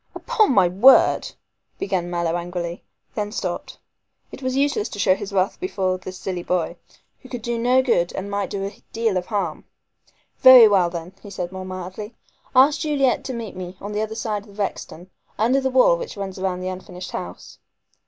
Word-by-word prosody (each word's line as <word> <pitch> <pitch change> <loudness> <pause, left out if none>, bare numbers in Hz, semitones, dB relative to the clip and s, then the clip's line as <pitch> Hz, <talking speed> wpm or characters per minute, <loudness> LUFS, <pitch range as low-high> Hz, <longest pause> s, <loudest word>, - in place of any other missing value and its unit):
"Upon 430 - +2
my 195 -7 +5
word 205 +10 +5 0.2
" - - -49
began 180 - -2
Mallow 170 -1 -1
angrily, 175 0 -4 0.3
then 210 -1 -3
stopped. 185 -5 -4 0.5
It - - -10
was 255 0 -1
useless 280 -6 +1
to - - -8
show 190 -1 +4
his 200 +1 -6
wrath 190 0 0
before 190 - -1
this 185 0 -8
silly 180 -2 -4
boy, 175 -1 -1 0.4
who 260 - -15
could 245 -4 -6
do 235 -1 -2
no 250 +2 +3
good 175 -9 +1
and 200 +1 -5
might 200 -1 -2
do 195 -1 -3
a 200 - -4 0.2
deal 225 -3 0
of 180 0 -2
harm. 195 -8 -2 0.8
"Very 255 -3 +10
well, 190 -4 +3
then," 170 +1 -7
he 205 - -11
said 180 -3 -5
more 190 0 -7
mildly, 185 +4 -7 0.4
"ask 275 +3 +6
Juliet 280 -5 +1
to 260 - -4
meet 230 -5 -6
me 185 0 -7
on 205 - -6
the 210 0 -1
other 220 0 -3
side 215 -2 -3
of 200 0 -16
Rexton, 190 -3 -5 0.3
under 250 +5 +2
the 265 - 0
wall 260 - +5
which 485 - -7
runs 195 -1 -5
round 185 -1 -2
the - - -3
unfinished 180 0 -8
house." 90 - -8
200 Hz, 195 wpm, -22 LUFS, 185-235 Hz, 0.8 s, Very